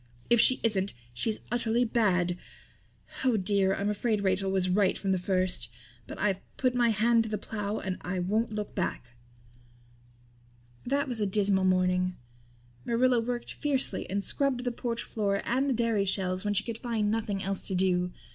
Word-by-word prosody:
If 235 -2 +6
she 255 - +6
isn't 200 -4 +1 0.2
she's 215 - -2
utterly 240 0 +1
bad. 185 -7 +1 0.9
Oh 250 -4 +3
dear, 195 0 +2
I'm 200 - -2
afraid 210 0 0
Rachel 190 0 +1
was 190 -1 +1
right 190 +1 +2
from 195 - -1
the 190 - +1
first. 185 -8 +1 0.4
But - - -8
I've 195 -2 0 0.2
put 255 -2 +1
my 240 -1 +3
hand 225 +1 +3
to - - -5
the 210 - -1
plow 210 0 -4
and 190 -1 -4
I 180 +1 -3
won't 210 +6 0
look 210 -1 -4
back." 150 -9 -3 1.8
That 280 +2 +1
was 245 -3 -3
a 205 - +1
dismal 195 -1 +2
morning. 185 0 +2 0.7
Marilla 245 +1 +2
worked 240 +1 -3
fiercely 280 -3 0
and 200 +1 -1
scrubbed 270 0 0
the 245 - -1
porch 235 0 -3
floor 200 -2 -1
and 265 +4 +1
the - - +2
dairy 225 -3 +1
shelves 185 -1 -1
when 205 0 -1
she 210 - +3
could 230 -1 -5
find 225 -4 -1
nothing 210 -3 -2
else 195 0 -1
to 190 - -2
do. 180 -1 +1
205 Hz, 175 wpm, -29 LUFS, 190-235 Hz, 1.8 s, If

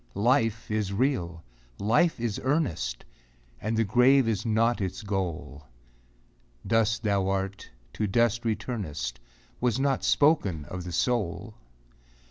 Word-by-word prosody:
Life 115 +1 +1
is 105 -2 -1
real! 100 - -1 0.3
Life 125 - +2
is 115 -3 -2
earnest! 130 - -1 0.6
And 110 +2 -1
the 115 - +3
grave 125 +4 +4
is 110 0 -1
not 115 +1 +2
its 95 +3 -4
goal; 90 -8 -4 1.0
Dust 115 0 +1
thou 100 -3 +1
art, 95 0 -3 0.2
to 105 - -1
dust 115 +2 +2
returnest, 100 - -3 0.4
Was 125 0 +1
not 135 -1 +1
spoken 105 - +2
of 90 +5 -7
the 90 - -5
soul. 105 -1 -1
110 Hz, 120 wpm, -27 LUFS, 95-120 Hz, 1.0 s, grave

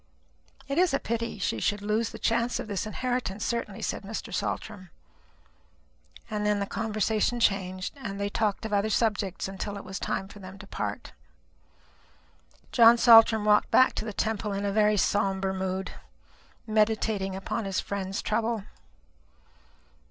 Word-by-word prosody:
"It 275 +4 0
is 360 -6 +3
a - - 0
pity 230 0 -3
she 165 - -1
should 205 - -1
lose 215 +2 0
the - - -9
chance 235 +1 0
of - - -5
this 205 +1 -3
inheritance, 245 -2 -2
certainly," 230 -4 -3
said - - -2
Mr. 210 +2 -6
Saltram. 195 -4 -4 1.4
And 210 -1 -3
then 210 -1 +2
the 200 - -1
conversation 220 +2 0
changed, 185 -4 0
and 200 -7 -6
they 200 - 0
talked 210 0 -1
of 220 - -4
other 205 +1 +2
subjects 205 -4 0
until 200 +1 -5
it 200 - -8
was 190 +1 -6
time 190 0 -2
for 205 - -13
them 190 0 -10
to 200 - -11
part. 105 - -5 1.6
John 235 0 +7
Saltram 225 -2 +7
walked 210 0 +4
back 260 - +5
to - - -4
the 220 - -4
Temple 210 0 -2
in 200 +1 -2
a 200 - 0
very 210 0 +3
sombre 195 -1 +1
mood, 190 0 -3 0.7
meditating 215 -3 +1
upon 195 +3 -3
his 195 -1 -1
friend's 195 -1 -4
trouble. 225 -1 -1
210 Hz, 155 wpm, -27 LUFS, 195-225 Hz, 1.6 s, John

